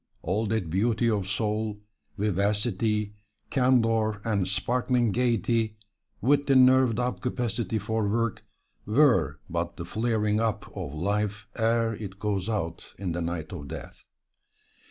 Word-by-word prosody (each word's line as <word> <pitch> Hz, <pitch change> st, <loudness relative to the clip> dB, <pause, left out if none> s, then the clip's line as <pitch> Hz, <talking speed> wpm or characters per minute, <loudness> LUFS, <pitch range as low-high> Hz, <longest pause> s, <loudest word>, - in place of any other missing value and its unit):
All 105 Hz, +6 st, 0 dB
that 100 Hz, -6 st, -1 dB
beauty 110 Hz, +5 st, +2 dB
of 100 Hz, -3 st, -1 dB
soul, 105 Hz, +1 st, -1 dB, 0.4 s
vivacity, 105 Hz, +1 st, 0 dB, 0.4 s
candor 115 Hz, -5 st, +2 dB
and 100 Hz, -5 st, +1 dB
sparkling 120 Hz, +4 st, +1 dB
gaiety, 115 Hz, -2 st, +1 dB, 0.4 s
with 140 Hz, +4 st, +3 dB
the 135 Hz, -, +4 dB
nerved 130 Hz, -3 st, +6 dB
up 125 Hz, 0 st, -1 dB
capacity 120 Hz, -2 st, -1 dB
for 110 Hz, +1 st, -1 dB
work, 115 Hz, +1 st, -1 dB, 0.4 s
were 105 Hz, -, +3 dB
but 85 Hz, 0 st, -3 dB
the 85 Hz, -, -5 dB
flaring 110 Hz, 0 st, 0 dB
up 115 Hz, -2 st, -2 dB
of 70 Hz, -, -5 dB
life 105 Hz, +4 st, -1 dB
ere 115 Hz, 0 st, +2 dB
it 100 Hz, -3 st, -7 dB
goes 100 Hz, -1 st, -1 dB
out 85 Hz, -7 st, -4 dB
in 95 Hz, -3 st, -3 dB
the 85 Hz, +1 st, -2 dB
night 85 Hz, 0 st, -4 dB
of 75 Hz, -5 st, -7 dB
death. 80 Hz, +2 st, -9 dB
110 Hz, 135 wpm, -27 LUFS, 95-115 Hz, 0.4 s, nerved